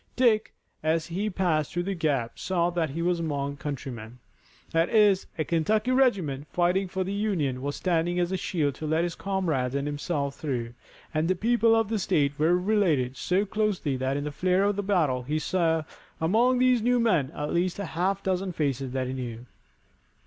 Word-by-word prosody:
Dick, 225 Hz, -4 st, +3 dB, 0.3 s
as 160 Hz, +1 st, +1 dB
he 195 Hz, +5 st, -2 dB
passed 175 Hz, -6 st, 0 dB
through 175 Hz, -, -1 dB
the 195 Hz, +2 st, -2 dB
gap, 145 Hz, -9 st, -1 dB
saw 175 Hz, -2 st, 0 dB
that 170 Hz, -3 st, -1 dB
he 165 Hz, +5 st, -3 dB
was 175 Hz, 0 st, +1 dB
among 140 Hz, -3 st, -2 dB
countrymen. 125 Hz, -5 st, -6 dB, 0.5 s
That 165 Hz, +1 st, +2 dB
is, 210 Hz, -4 st, +4 dB
a 155 Hz, -, +1 dB
Kentucky 210 Hz, +9 st, +1 dB
regiment, 185 Hz, -, +1 dB
fighting 180 Hz, +2 st, +1 dB
for 185 Hz, +1 st, -2 dB
the 190 Hz, +2 st, -4 dB
Union 175 Hz, -12 st, -1 dB
was 145 Hz, +1 st, -3 dB
standing 175 Hz, 0 st, 0 dB
as 175 Hz, 0 st, 0 dB
a -, -, 0 dB
shield 155 Hz, -6 st, -1 dB
to 155 Hz, -, -2 dB
let 160 Hz, +2 st, +1 dB
his 175 Hz, -1 st, -2 dB
comrades 165 Hz, -11 st, -1 dB
and 140 Hz, 0 st, -1 dB
himself 145 Hz, -1 st, -2 dB
through, 125 Hz, -6 st, -4 dB, 0.4 s
and 155 Hz, +1 st, +1 dB
the 185 Hz, -, +2 dB
people 230 Hz, +3 st, +3 dB
of 225 Hz, -2 st, +1 dB
the 225 Hz, -2 st, 0 dB
state 145 Hz, -6 st, +1 dB
were 165 Hz, +3 st, +4 dB
related 180 Hz, -10 st, +1 dB
so 185 Hz, +8 st, 0 dB
closely 205 Hz, -8 st, -1 dB
that 130 Hz, +2 st, -1 dB
in 145 Hz, -, -2 dB
the 150 Hz, -, -3 dB
flare 180 Hz, +6 st, +1 dB
of 205 Hz, 0 st, +2 dB
the 205 Hz, -, -1 dB
battle 165 Hz, -11 st, +1 dB
he 145 Hz, +5 st, -2 dB
saw 165 Hz, -1 st, +1 dB, 0.4 s
among 230 Hz, +10 st, +3 dB
these 250 Hz, -1 st, +4 dB
new 245 Hz, +2 st, +2 dB
men 180 Hz, -, +2 dB
at 150 Hz, 0 st, -3 dB
least 175 Hz, +1 st, 0 dB
a 200 Hz, -, -3 dB
half 180 Hz, +5 st, -1 dB
dozen 190 Hz, 0 st, -1 dB
faces 135 Hz, -4 st, -2 dB
that 130 Hz, -1 st, -1 dB
he 130 Hz, -, -4 dB
knew. 120 Hz, -2 st, -6 dB
170 Hz, 195 wpm, -27 LUFS, 145-195 Hz, 0.5 s, is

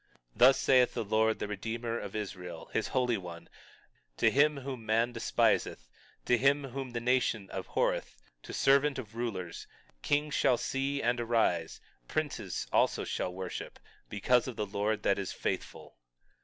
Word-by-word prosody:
21:7 -, -, -24 dB
Thus 130 Hz, +3 st, +7 dB
saith 130 Hz, -2 st, +4 dB
the -, -, -1 dB
Lord, 110 Hz, +2 st, +2 dB
the -, -, -3 dB
Redeemer 115 Hz, +3 st, -3 dB
of 100 Hz, -, -7 dB
Israel, 90 Hz, -5 st, -6 dB
his 110 Hz, -, 0 dB
Holy 125 Hz, -3 st, +1 dB
One, 85 Hz, -2 st, -9 dB, 0.7 s
to -, -, +4 dB
him 150 Hz, +1 st, +4 dB
whom 130 Hz, -3 st, -6 dB
man 115 Hz, +2 st, +1 dB
despiseth, 110 Hz, -, +1 dB, 0.4 s
to 120 Hz, -, +3 dB
him 140 Hz, +3 st, +3 dB
whom 135 Hz, 0 st, -5 dB
the 120 Hz, -, -1 dB
nation 120 Hz, -4 st, 0 dB
abhorreth, -, -, -1 dB, 0.2 s
to -, -, -10 dB
servant 140 Hz, +1 st, +3 dB
of 115 Hz, -4 st, -8 dB
rulers: 95 Hz, -8 st, -4 dB, 0.3 s
Kings 145 Hz, -, 0 dB
shall 125 Hz, -3 st, +3 dB
see 140 Hz, +3 st, -2 dB
and 120 Hz, +1 st, +1 dB
arise, 110 Hz, -8 st, +1 dB, 0.3 s
princes -, -, -3 dB
also -, -, +2 dB
shall 90 Hz, -, -2 dB
worship, 90 Hz, 0 st, -6 dB, 0.3 s
because 120 Hz, +5 st, +2 dB
of 130 Hz, -, -5 dB
the 105 Hz, -, -2 dB
Lord 105 Hz, +1 st, -1 dB
that 100 Hz, -, +2 dB
is 95 Hz, -, -3 dB
faithful. -, -, -5 dB
115 Hz, 155 wpm, -31 LUFS, 100-130 Hz, 0.7 s, Thus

